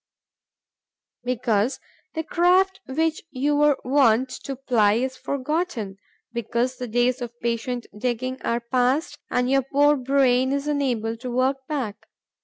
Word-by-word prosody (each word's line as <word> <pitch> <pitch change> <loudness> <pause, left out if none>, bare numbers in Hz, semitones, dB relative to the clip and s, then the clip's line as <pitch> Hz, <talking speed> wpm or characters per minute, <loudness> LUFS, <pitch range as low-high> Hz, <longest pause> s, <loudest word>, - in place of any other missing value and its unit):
Because 245 -1 0 0.4
the 320 - -1
craft 370 +4 +3
which 315 +4 0
you 290 +2 0
were 295 -1 +4
wont 255 -2 +3 0.2
to 275 - -3
ply 240 -6 +3
is 260 +4 -1
forgotten; 275 - -2 0.4
because 235 +2 -1
the 250 - -4
days 245 +3 +1
of 240 0 -7
patient 235 +1 -2
digging 250 +3 -2
are 235 +1 -1
past 260 +6 0
and 250 0 +1
your 270 +1 +3
poor 290 +3 +3
brain 260 -1 +2
is 280 0 -1
unable 250 -7 0
to 250 +2 -6
work 265 +2 0
back. 240 -8 -4
255 Hz, 135 wpm, -24 LUFS, 240-280 Hz, 0.4 s, were